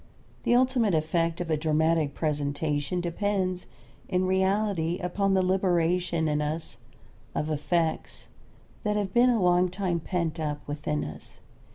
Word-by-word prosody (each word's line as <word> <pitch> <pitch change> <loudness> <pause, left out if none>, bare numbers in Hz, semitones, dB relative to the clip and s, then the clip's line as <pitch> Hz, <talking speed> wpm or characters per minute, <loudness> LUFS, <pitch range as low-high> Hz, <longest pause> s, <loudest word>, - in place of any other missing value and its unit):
The 240 - +4
ultimate 245 -6 +3
effect 165 +1 0
of 165 -2 -3
a 155 - +2
dramatic 155 -1 +1
presentation 145 +2 -1
depends, 185 +1 -1 0.4
in 185 0 +1
reality, 190 -2 +1
upon 195 +2 0
the 190 - +3
liberation 175 -2 +1
in 150 0 +1
us 155 +2 -3 0.6
of 155 +1 -1
affects 160 +2 -1 0.5
that 210 0 0
have 200 -2 -2
been 245 +1 +5
a 235 -2 +3
long 180 0 +3
time 185 -2 -1
pent 170 -1 -2
up 150 -2 -3
within 150 0 -2
us. 75 0 -9
175 Hz, 140 wpm, -27 LUFS, 155-190 Hz, 0.6 s, been